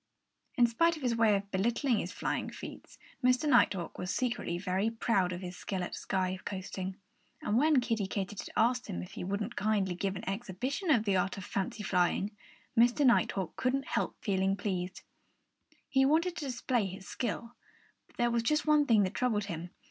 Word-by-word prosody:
In 245 - +6
spite 335 +9 +3
of 300 - -10
his 240 -2 +1
way 225 -2 +4
of 200 0 -3
belittling 235 +5 +1
his - - -4
flying - - -2
feats, - - -10 0.3
Mr. 255 +4 +3
Nighthawk 205 - +3
was 180 - -3
secretly 235 -6 -1
very 185 +4 0
proud 225 -5 +1
of 180 0 -5
his 180 -1 -6
skill 185 0 -3
at - - -5
sky 185 -1 -1
coasting. 190 -1 -5 0.5
And 210 - 0
when 295 +3 +5
Kiddie 225 -5 -1
Katydid 195 0 -4
asked 245 +2 +2
him 85 0 -4
if 90 - -10
he - - -6
wouldn't 200 +5 -3
kindly 205 -3 +1
give 195 +2 -2
an 195 +4 -7
exhibition 240 - -3
of 235 -8 +4
the 195 -2 +3
art 190 +2 0
of 195 - -6
fancy 200 +2 -3
flying, 190 +3 +1 0.4
Mr. 240 +5 +4
Nighthawk 200 -7 +2
couldn't 265 +1 0
help - - -1
feeling 195 -2 +1
pleased. 185 -3 -3 0.8
He 270 -1 +3
wanted 330 +6 +3
to 300 - -3
display 245 -4 0
his 190 +1 -9
skill. 235 0 -3 0.5
But - - -26
there 240 -1 +2
was 235 0 +2
just 300 +6 +1
one 300 -1 +4
thing 220 -3 +5
that 185 - -1
troubled 225 -5 +1
him. 175 -3 -5
210 Hz, 185 wpm, -31 LUFS, 190-245 Hz, 0.8 s, In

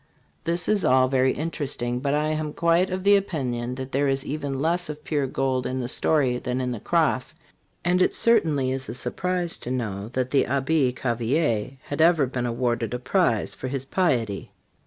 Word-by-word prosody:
This 170 +1 0
is 210 -2 +2
all 130 0 +4
very 130 0 +3
interesting, 140 -6 -3
but 140 +2 0
I 150 +1 +1
am 155 -1 -2
quite 170 +2 +2
of 185 0 -3
the 200 +1 +6
opinion 125 -11 -2
that 130 0 -6
there 140 +2 +1
is 135 0 0
even 140 -2 -3
less 170 +3 0
of 150 0 -7
pure 145 -4 -1
gold 130 -1 -1
in 130 +1 -3
the 125 - -2
story 130 -2 +1
than 125 0 -2
in 125 -1 -1
the 120 - -4
cross; - - 0 0.5
and 180 +1 +3
it - - +4
certainly 160 - +2
is 135 0 -3
a - - -3
surprise 180 +5 -1
to - - -7
know 105 -6 -3
that 130 0 -1
the 140 - +3
Abbe 135 -1 +1
Cavelier 120 0 0
had 145 +2 -3
ever 165 -3 +5
been 125 -1 -3
awarded 120 -1 -1
a - - -1
prize 125 - +1
for 130 - -6
his 135 0 -2
piety. 120 - 0
135 Hz, 195 wpm, -25 LUFS, 125-160 Hz, 0.5 s, the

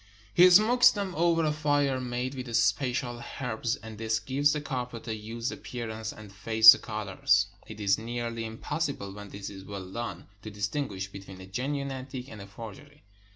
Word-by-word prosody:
He 180 +1 +8
smokes 220 +7 +7
them 200 -3 -3
over 165 0 +2
a 155 - +2
fire 145 -3 +1
made 125 +1 -3
with 125 -3 -2
special 120 +2 0 0.2
herbs, 120 -2 -1
and 110 0 -10
this 110 0 0
gives 135 +6 +2
the 150 - -1
carpet 125 -5 -5
a 110 - -2
used 115 +3 -4
appearance 110 -2 -5
and 105 -2 -12
fades 110 +2 +8
the - - +2
colors. 100 -2 +1 0.2
It 110 -1 -9
is 100 0 +2
nearly 115 0 -4
im 110 0 -7
possible, 140 -11 -3
when 105 0 -9
this 100 0 -7
is 95 -1 -10
well 95 -2 -8
done, 100 -5 -5 0.2
to 110 - -7
distinguish 105 -1 -3
between 95 -1 -11
a 95 - -9
genuine 140 +7 -3
antique 130 0 -7
and 105 -2 -9
a 100 - -9
forgery. 115 +8 -11
115 Hz, 185 wpm, -28 LUFS, 105-140 Hz, 0.2 s, He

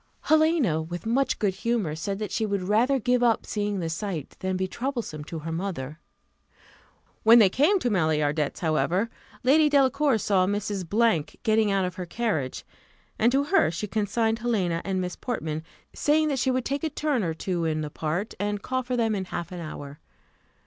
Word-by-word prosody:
Helena, 310 - +3
with 175 +4 -6
much 260 +5 +1
good 205 -4 0
humour, 220 -6 -1
said 195 +5 -3
that 210 0 -4
she 225 - -1
would 200 -3 -1
rather 230 +8 +3
give 250 0 +1
up 235 -2 +2
seeing 205 -2 -2
the 165 - -2
sight 165 -2 -4
than 185 -1 -1
be 190 0 -1
troublesome 235 - -4
to 165 - -6
her 160 +1 -5
mother. 165 -4 -4 1.2
When 225 +2 +7
they 210 -5 +7
came 295 - +3
to 245 -10 -1
Maillardet's, 155 -5 0
however, 180 +6 +1 0.3
Lady 300 +4 +5
Delacour 280 -2 +3
saw 190 -3 +2
Mrs. 205 -2 0
getting 220 -2 +3
out 195 -1 +1
of 180 +1 -5
her 180 -1 -5
carriage, 170 - -2 0.5
and 235 +2 +4
to 275 +2 +2
her 355 - +3
she 170 +6 -3
consigned 220 +2 0
Helena 190 -8 0
and 190 -1 -1
Miss 180 -1 -3
Portman, 160 -11 -3 0.3
saying 310 +1 +2
that 275 -3 -1
she 260 - +1
would 255 -1 0
take 280 +2 -2
a 320 - 0
turn 295 -5 -1
or 165 -2 -2
two 175 0 -2
in 155 -1 0
the 150 -1 -5
park, 165 +9 -3
and 205 0 -2
call 255 0 -1
for 250 0 -3
them 225 -2 +1
in 195 -2 -2
half 175 -1 -5
an 180 - -6
hour. 145 -3 -8
205 Hz, 190 wpm, -26 LUFS, 170-245 Hz, 1.2 s, When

